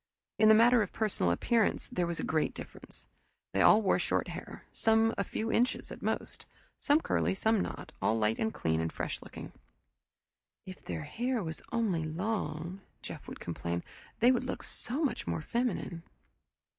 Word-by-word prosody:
In 215 - +7
the 220 - +9
matter 235 +2 +6
of 205 - -2
personal 200 - +1
appearance, 225 - +1
there 175 -1 0
was 170 -1 -3
a - - -2
great 155 -1 0
difference. - - -11 0.5
They 95 - +2
all 215 - +7
wore 190 - +3
short - - 0
hair, - - -8
some 225 0 +3
few 225 +1 -3
inches 245 +2 +1
at - - -8
most; - - -3 0.3
some 290 +2 +3
curly, 190 - +1
some 220 +2 +2
not; - - -5
all 110 - +2
light 110 0 +1
and 220 - +1
clean 80 - 0
and 80 0 -2
fresh - - -4
looking. - - -9 1.1
"If 185 -1 -10
their 80 -3 -4
hair 245 - -1
was 160 -1 -5
only 215 -9 +1
long," 170 0 -3 0.2
Jeff - - -8
would - - -8
complain, 85 0 -3 0.4
"they 245 +2 +7
would 255 0 +1
look 255 - -4
so 265 +7 -3
much 280 - -1
more 85 -2 -2
feminine." 235 -8 -2
205 Hz, 170 wpm, -31 LUFS, 155-230 Hz, 1.1 s, the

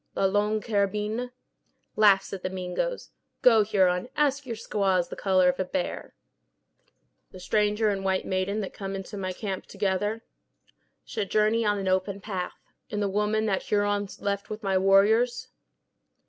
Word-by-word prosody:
"La - - +1
Longue 210 +2 +1
Carabine?" 210 +3 -1 0.7
"Laughs 200 -3 +4
at 195 - -5
the 185 - -2
Mingoes. 185 - -3 0.3
Go, 230 -3 +7
Huron, 190 0 +1
ask 285 -2 +1
your 230 - -3
squaws 195 -5 0
the - - -6
color 185 -2 +3
of 180 +1 +1
a - - +2
bear." 180 0 -4 1.1
"The 185 - -12
stranger 210 +3 +1
and 195 -1 -2
white 190 -1 0
maiden 190 +3 -1
that 195 - -6
come 195 -1 -5
into 195 +1 -7
my 190 -2 -3
camp 190 0 -5
together?" 205 +3 -1 0.8
"Should 210 -4 -4
journey 215 +2 +2
on 205 -1 +1
an 195 -1 -3
open 190 +1 0
path." 190 -3 -5 0.3
"And 210 - -3
the 205 - +1
woman 210 +2 0
that 195 -3 0
Huron 205 -1 0
left 200 0 -2
with 215 +1 -6
my 195 -1 0
warriors?" 205 +6 +3
200 Hz, 160 wpm, -27 LUFS, 190-215 Hz, 1.1 s, Go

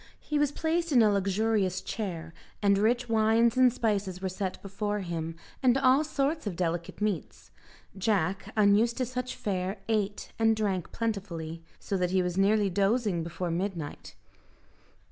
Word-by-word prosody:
He 300 -1 -2
was 290 -1 +2
placed 330 +2 -1
in 245 -5 +6
a 210 - +4
luxurious 200 -1 +1
chair, 170 -7 -5 0.3
and 200 -1 +4
rich 240 +4 +2
wines 225 +1 +3
and 255 -1 +6
spices 205 -6 -1
were 190 0 -2
set 185 0 -4
before 205 +1 -2
him, 165 -2 -4 0.3
and 255 0 +4
all 270 +2 +4
sorts 300 -2 -1
of 190 - -3
delicate 170 +2 -3
meats. 210 -6 -3 0.4
Jack, 195 0 0
unused 215 +3 +4
to 255 - 0
such 255 +1 -4
fare, 190 0 -2
ate 210 -2 -1
and 225 0 +4
drank 195 -5 -1
plentifully, 180 -8 -4 0.2
so 195 - -3
that 180 -1 0
he 185 0 +2
was 180 -1 -2
nearly 205 +2 +3
dozing 195 0 +1
before 170 +1 -4
midnight. 170 -3 -4
205 Hz, 155 wpm, -29 LUFS, 185-230 Hz, 0.4 s, in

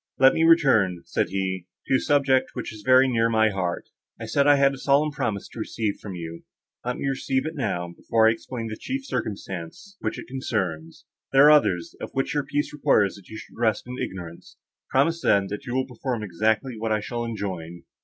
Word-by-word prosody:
"Let 135 0 +6
me 160 - +1
return," 130 - +4
said - - -1
he, 95 -2 -3 0.2
"to - - -1
a - - -2
subject, 140 -3 +2
which - - -5
is 105 - -11
very 130 +3 +5
near 115 -2 +2
my 110 -1 +3
heart. 90 -3 -3 0.3
I - - -5
said 140 0 +2
I 145 - +7
had 140 0 +4
a 135 - -8
solemn 145 +3 +2
promise 105 -8 -3
to - - -10
receive 110 -1 -2
from 100 -3 -7
you; 85 -1 -7 0.4
let 125 0 -2
me - - -3
receive 135 0 -1
it 160 - -3
now, 90 - -3
before 110 -1 +2
I - - +6
explain 115 +1 -5
the 110 - -6
chief 270 - -4
circumstance 100 - -5
which - - -3
it - - -7
concerns; 95 -11 -4 0.3
there 135 +1 +7
are 150 - +9
others, 105 - +3
of - - -5
which 135 - -1
your 145 -1 0
peace 145 +2 -2
requires 105 -9 +3
that 100 -3 -15
you 110 - -8
should - - -12
rest 110 -3 +1
in 125 +1 -7
ignorance. 85 -3 -7 0.3
Promise, 165 +5 +2
then, 100 -9 +3
that 115 +7 -6
you 120 - -3
will 130 0 +1
perform 125 -2 -4
exactly 110 +5 0
what 110 0 -2
I 110 - +2
shall 120 +3 -4
enjoin." 95 -7 -5
115 Hz, 215 wpm, -25 LUFS, 100-135 Hz, 0.4 s, are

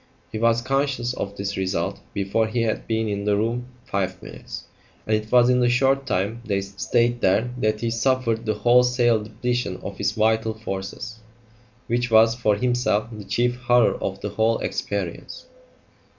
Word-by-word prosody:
He 110 - -4
was 115 0 +2
conscious 135 -2 0
of 100 -4 -5
this 100 0 -3
result 95 -3 -2
before 100 +3 0
he 115 +1 -1
had 110 -1 -2
been 110 0 0
in 100 -1 -3
the 105 -1 +2
room 120 +3 -1 0.2
five 95 -1 -2
minutes, - - -8 0.4
and 110 - +2
it 110 0 -4
was 120 -1 +6
in 125 0 +3
the 120 -1 +3
short 135 +2 +2
time 100 +6 -1
they 100 -4 -1
stayed 115 +5 0
there 110 +6 +2
that 110 -1 0
he 115 -1 -1
suffered 115 -1 0
the 110 - +1
wholesale 120 -1 +3
depletion 120 +3 -2
of - - -7
his - - 0
vital 110 0 +1
forces, 110 +1 -6 0.7
which 120 +1 0
was, 115 0 +6
for 115 -3 +1
himself, 120 -1 0
the 105 -2 -8
chief 120 +5 0
horror 120 -1 +3
of 95 0 -3
the 105 - -3
whole 110 +2 +1
experience. 100 -5 -4
115 Hz, 170 wpm, -23 LUFS, 105-120 Hz, 0.7 s, was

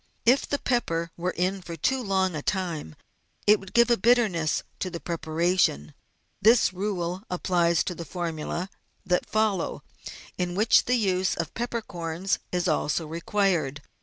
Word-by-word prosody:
If 250 +4 +4
the 285 - +1
pepper 170 -12 -1
were 175 +1 -2
in 185 +2 0
for 170 -2 -7
too 260 - 0
long 190 -5 0
a 150 - -3
time 165 - -3 0.5
it 210 0 +6
would 195 - -12
give 235 0 +4
a 235 - +4
bitterness 205 -8 +2 0.2
to 185 - -2
the 170 -1 -6
preparation. 165 - 0 0.5
This 225 -3 +5
rule 185 -3 -2
also 185 +4 -8
applies 175 -2 +2
to 180 - -3
the 170 - -7
formula; 170 +2 -4 0.3
that 180 -1 0
follow, 215 -5 0 0.6
in 180 -1 -1
which 215 +4 +4
the 250 - +2
use 190 -5 +1
of 165 -1 -4
peppercorns 195 -7 -3
is 180 0 0
also 155 0 0
required. 165 -3 0
180 Hz, 155 wpm, -26 LUFS, 170-205 Hz, 0.6 s, it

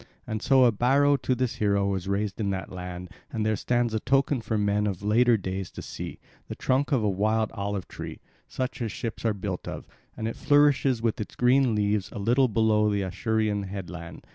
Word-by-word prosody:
And 110 -1 -4
so 135 -1 +5
a 120 - +6
barrow 135 +6 +3
to 130 - 0
this 125 -1 -1
hero 100 -1 +2
was 95 -2 -2
raised 100 +1 -1
in 105 -2 0
that 95 -1 -4
land, 90 -1 -7 0.2
and 110 -2 -2
there 110 0 +2
stands 120 +1 0
a 110 - +1
token 135 +1 +1
for 110 -1 -2
men 105 0 +1
of 100 -1 -4
later 115 +3 +4
days 95 -1 -4
to - - -7
see, - - -7 0.3
the - - -6
trunk 130 +2 0
of 130 -6 +2
a - - +2
wild 110 +3 +1
olive 100 -3 -3
tree, - - -8 0.3
such 130 -1 -4
as 115 -3 -2
ships 115 0 -5
are 110 -2 +2
built 95 -2 -5
of; - - -6 0.3
and 110 - -2
it 115 - -4
flourishes 140 -4 +3
with 115 -2 0
its 105 - -7
green 125 -1 +3
leaves 105 -1 0
a - - -8
little 120 +6 +3
below 110 -1 +2
the 100 -1 0
Acherusian 105 +2 -1
headland. 90 -3 -8
110 Hz, 210 wpm, -26 LUFS, 100-120 Hz, 0.3 s, a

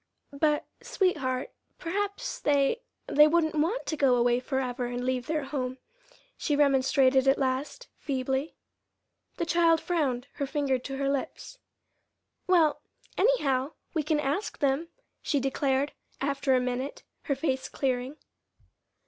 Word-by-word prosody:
"But, 300 +1 +1 0.2
sweetheart, 330 - 0 0.3
perhaps 405 +7 -3
they 285 - +2 0.2
they 300 +1 +6
wouldn't 315 0 +2
want 330 +11 0
to 315 - -2
go 275 -4 +4
away 240 0 +3
forever 255 -1 -2
and 245 +1 -4
leave 255 -1 -1
their 310 -2 -1
home," 260 -2 -3 0.6
she 295 - -1
remonstrated 270 -1 +4
at 270 - +5
last, 270 - -2
feebly. 265 +1 -2 0.8
The 340 - -1
child 335 -1 +4
frowned, 295 -8 -1
her 280 - -1
finger 275 -2 0
to 270 +2 -6
her 275 0 -1
lips. 280 - -3 0.9
"Well, 335 -5 +4 0.3
anyhow, 295 - +2 0.2
we 320 - +1
can 305 0 0
ask 295 +8 -2
them," 280 +4 +1 0.3
she 290 - 0
declared, 270 +1 0 0.3
after 275 -1 +1
a - - +4
minute, 250 +2 -3 0.2
her 280 - 0
face 265 -2 -1
clearing. 260 +1 -2
280 Hz, 130 wpm, -28 LUFS, 260-315 Hz, 0.9 s, they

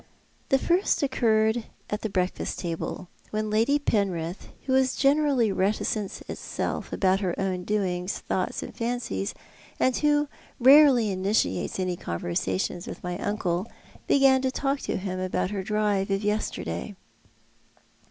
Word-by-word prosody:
The 270 - +5
first 345 +2 +1
occurred 225 -3 +2 0.3
at 210 - -2
the 220 - -2
breakfast 185 -2 -1
table, 170 +1 -4 0.2
when 215 0 -2
Lady 230 +7 +3
Penrith, 190 - -1 0.2
who 260 - 0
is 265 -1 +3
generally 275 -5 +3
reticence 200 +1 -1
itself - - -4
about 190 0 +2
her 185 -4 -2
own 185 -2 -1
doings, 185 -3 -1
thoughts, - - -2
and - - -9
fancies, 235 -4 -2 0.4
and 255 -1 +3
who 295 0 +2 0.3
rarely 265 -4 +7
initiates 190 +1 0
any 185 -1 0
conversation 90 - -2
with - - -8
my 180 0 -3
uncle, 195 -2 -1 0.4
began 270 -1 +5
to 260 - +1
talk 275 +1 -1
to - - -2
him 185 -1 -4
about 185 0 -1
her 200 -2 -2
drive 205 -1 0
of 195 +1 0
yesterday. 210 0 -2
210 Hz, 135 wpm, -26 LUFS, 185-255 Hz, 0.4 s, rarely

